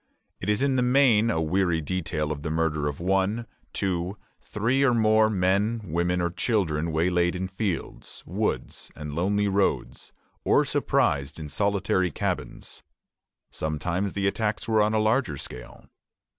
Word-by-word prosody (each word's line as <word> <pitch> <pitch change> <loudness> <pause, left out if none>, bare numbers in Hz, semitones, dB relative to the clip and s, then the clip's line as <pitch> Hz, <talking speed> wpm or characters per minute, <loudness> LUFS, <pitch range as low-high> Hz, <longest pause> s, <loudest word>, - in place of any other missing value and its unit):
It - - -4
is 105 +5 +2
in 135 -2 +2
the - - +3
main 125 -3 +4
a 80 - 0
weary 85 +1 +1
detail 80 -2 -2
of 70 -2 -4
the 80 - -3
murder 80 -2 0
of 75 -1 -4
one, 95 +5 0 0.3
two, 95 0 -2 0.2
three, 115 +6 0
or 130 -3 +4
more 110 -1 +4
men, 100 +3 +1
women, 85 +1 0
or 85 -1 0
children 85 -5 0
waylaid 85 +2 +1
in 95 +1 -2
fields, 95 - -4
woods, - - -3
and 75 -1 -7
lonely 100 +5 +1
roads, 95 -10 -1 0.3
or - - +3
surprised 70 +2 0
in 75 -1 -6
solitary 100 +1 +1
cabins. - - -4 0.7
Sometimes 85 +5 -2
the 100 -1 -1
attacks 105 +2 -1
were 110 -1 +3
on 105 +1 +2
a - - +3
larger 110 - +1
scale. 60 -2 -9
95 Hz, 150 wpm, -26 LUFS, 80-105 Hz, 0.7 s, main